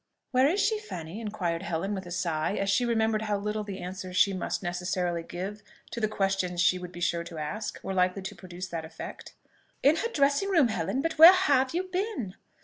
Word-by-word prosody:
"Where 260 +1 +4
is 360 +7 +1
she, 425 +1 +2
Fanny?" 180 - -7
inquired 185 -6 -2
Helen, 190 +2 -2
with 190 -2 -5
a - - -8
sigh, 170 0 -1
as 195 0 0
she 245 - +2
remembered 220 -2 +1
how 210 -2 0
little 210 +1 -2
the 200 -2 -6
answers 185 0 -6
she 200 0 +5
must 185 +1 -3
necessarily 175 -1 -1
give 190 +5 -6 0.3
to 235 - -4
the 215 - +3
questions 195 -4 -1
she 180 +1 +3
would 180 -1 -8
be 175 - -9
sure 170 -1 0
to 170 -1 -9
ask 175 +9 -4
were 195 - -3
likely 185 +1 +1
to 195 - -6
produce 180 0 -8
that 165 -2 -4
effect. 160 +1 -9 0.5
"In 295 +4 +5
her 465 - 0
dressing 285 +6 +2
room, 320 -10 +4
Helen. 260 +4 -1
But 325 -1 -2
where 330 +3 +12
have 285 -7 +2
you 360 - +1
been?" 370 - -3
195 Hz, 215 wpm, -28 LUFS, 180-255 Hz, 0.5 s, where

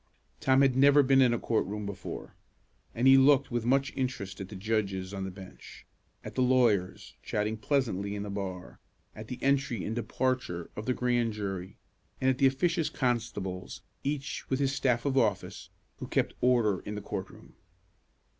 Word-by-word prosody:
Tom 130 0 +4
had 135 -2 +3
never 140 +2 +6
been 135 0 +5
in 125 -2 +5
a 120 - +1
court 115 0 0
room 105 +1 -4
before, 100 -1 -7 0.6
and 120 - 0
he 135 0 +8
looked 140 0 +4
with 120 -1 -1
much 135 +1 +2
interest 125 -8 -3
at 95 - -7
the 105 - -8
judges 100 -2 -2
on 95 -1 -4
the - - -4
bench, 95 0 -12 0.4
at - - -8
the 130 - 0
lawyers 120 -8 +2
chatting 105 +1 -1
pleasantly 110 -5 -1
in 100 - -4
the 105 - -5
bar, 95 -2 -6 0.4
at 110 0 -9
the 125 - -5
entry 135 -6 +1
and 110 - -3
departure 120 -7 -2
of 105 - -6
the 125 - +1
grand 120 -2 +1
jury, 95 -3 -5 0.4
and 130 0 +3
at 130 - -4
the 135 - +6
officious 165 +5 +1
constables, 115 -7 -3 0.2
each 145 0 -3
with 130 - +1
his 140 -1 +1
staff 125 -3 +1
of 135 -1 +2
office, 110 -4 -1 0.3
who - - -7
kept - - 0
order 115 -6 +3
in 105 - -6
the 105 - -5
court - - -5
room. - - -16
120 Hz, 185 wpm, -29 LUFS, 100-130 Hz, 0.6 s, he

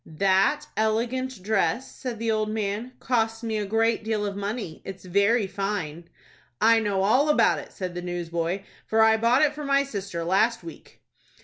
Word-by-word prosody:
"That 195 +1 +3
elegant 230 +1 -1
dress," 220 +5 0
said 250 -3 -5
the 225 0 -1
old 215 -1 0
man, 215 +3 -3
"cost 225 -2 0
me 220 -1 -1
a 205 - -3
great 225 +2 +1
deal 215 -1 -1
of 200 -1 -3
money. 200 -4 -4
It's 190 -1 -9
very 200 +5 +2
fine." 190 -5 -4 0.5
"I 230 0 +5
know 200 -3 0
all 260 +9 +3
about 300 - +4
it," - - -11
said 185 -2 -5
the 175 - -5
newsboy, 175 +1 -3 0.2
"for 220 0 +4
I 220 0 +5
bought 235 +5 +3
it 300 -1 +3
for 300 0 -7
my 275 0 +3
sister 200 -9 -5
last 195 +5 +2
week." 165 -1 -12
215 Hz, 180 wpm, -25 LUFS, 195-230 Hz, 0.5 s, I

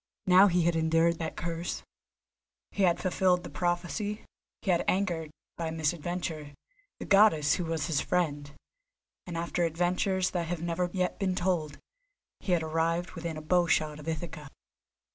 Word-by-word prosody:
Now 185 +2 +7
he 180 -2 +2
had 170 0 +2
endured 165 +1 +2
that 160 -1 -4
curse, 170 0 -4 0.9
he 200 - -3
had 175 -3 +3
fulfilled 180 -1 +2
the - - -8
prophecy, 180 +5 -2 0.4
he 195 - +2
had 170 - +2
angered, 175 -5 0 0.3
by 165 -1 -2
misadventure, 160 -1 -3 0.4
the - - -7
Goddess 195 -8 +5
who 180 - -1
was 160 -2 -2
his 150 -2 0
friend, 145 -5 -1 0.8
and 170 -2 -4
after 170 +1 -1
adventures 180 +3 +1
that 170 -2 -2
have 175 0 -3
never 170 +1 -1
yet 180 -1 -1
been 190 -2 0
told, 175 -5 -1 0.6
he 185 - -1
had 170 -2 +2
arrived 165 +2 0
within 165 -2 -5
a 155 - -7
bowshot 155 -3 +2
of 150 - -11
Ithaca. 160 -2 -5
170 Hz, 155 wpm, -29 LUFS, 160-180 Hz, 0.9 s, Now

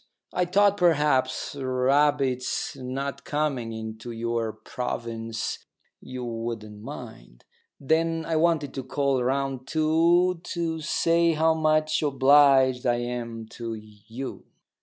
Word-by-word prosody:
I 180 - +1
thought 200 +3 +3
perhaps, 150 -8 +2
rabbits 135 0 +1
not 135 +2 -5
coming 145 -6 -1
into 110 +1 -7
your 115 -1 -2
province, 115 -2 -4 0.4
you 130 -1 -6
wouldn't 115 -3 -5
mind. - - -10 0.3
Then 165 +3 +1
I 165 - -1
wanted 155 -4 +1
to 135 - -4
call 135 -1 0
round 135 0 -1
too, 165 +3 +3
to 165 -2 -3
say 170 +1 +2
how 160 +1 +3
much 155 -1 +1
obliged 135 -2 +5
I 120 - +3
am 120 -2 -4
to 115 -1 -6
you." 110 +4 -9
135 Hz, 115 wpm, -26 LUFS, 120-155 Hz, 0.4 s, obliged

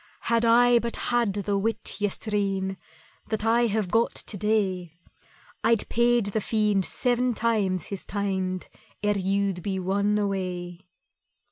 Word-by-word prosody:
"Had 230 0 +1
I 240 +1 +6
but 235 0 -3
had 240 -4 +1
the 200 0 -1
wit 220 +1 -1
yestreen 195 -2 -1 0.5
That 220 -1 -2
I 235 +1 +4
have 210 -4 -1
got 230 +1 +2
to - - -6
day, 190 -5 0 0.7
I'd 230 -3 +2
paid 240 -1 +3
the 220 - 0
Fiend 210 -3 +1
seven 245 -1 0
times 205 -7 0
his 195 - -5
teind 190 -2 -2 0.4
Ere 205 -1 +1
you'd 195 -1 0
been 190 -1 -3
won 200 +2 +1
away." 185 -3 -3
205 Hz, 135 wpm, -26 LUFS, 190-225 Hz, 0.7 s, I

